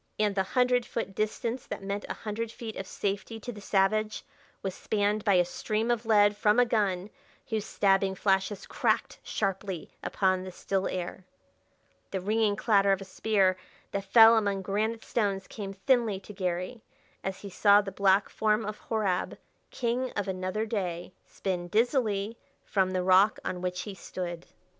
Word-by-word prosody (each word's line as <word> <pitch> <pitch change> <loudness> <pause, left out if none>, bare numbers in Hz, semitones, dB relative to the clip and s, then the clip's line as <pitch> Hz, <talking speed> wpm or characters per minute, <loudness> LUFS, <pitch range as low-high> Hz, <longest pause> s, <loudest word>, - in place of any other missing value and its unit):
And 210 -1 +2
the 195 - +1
hundred 250 +4 +2
foot 225 -4 -4
distance 225 +4 -2
that - - -6
meant 200 +1 -3
a - - -3
hundred 220 +1 -4
feet 225 -2 -7
of 190 - -6
safety 205 +4 -3
to 245 +3 -6
the 210 -3 -10
savage 215 +2 +1 0.4
was 190 -1 -2
spanned 205 +1 0
by 200 -4 +4
a 180 -1 +4
stream 215 +6 -1
of 235 -1 -1
lead 205 -2 +5
from 210 +2 +3
a 245 - +6
gun 205 -4 0 0.4
whose 220 -2 -2
stabbing 195 -1 +2
flashes 195 +1 0
cracked - - 0
sharply 195 -3 -3
upon 185 -1 +1
the 185 - -7
still 190 +1 -1
air. 185 +1 -4 0.9
The 190 - -2
ringing 210 +2 +1
clatter 200 -2 +3
of 195 0 +1
a - - -6
spear 190 -1 +2 0.3
that 200 0 -3
fell 225 +1 +8
among 200 -3 0
granite 215 +4 -1
stones 200 -4 0
came 200 -3 -6
thinly 215 0 +1
to 210 - -11
Garry 185 +4 -3 0.4
as 190 -1 -4
he 200 - -8
saw 200 +2 +6
the 195 -1 -6
black 195 +1 +3
form 215 0 +1
of 210 0 -5
Horab, 205 -5 0 0.3
king 250 +1 -1
of 205 -1 -1
another 185 +3 -2
day, 180 -6 -3
spin 180 -3 -3
dizzily 220 -1 +1 0.3
from 190 -2 +1
the 185 -1 -1
rock 190 +3 +5
on 180 - -3
which 180 0 -2
he 205 - -6
stood. 175 -2 -6
200 Hz, 170 wpm, -29 LUFS, 190-220 Hz, 0.9 s, fell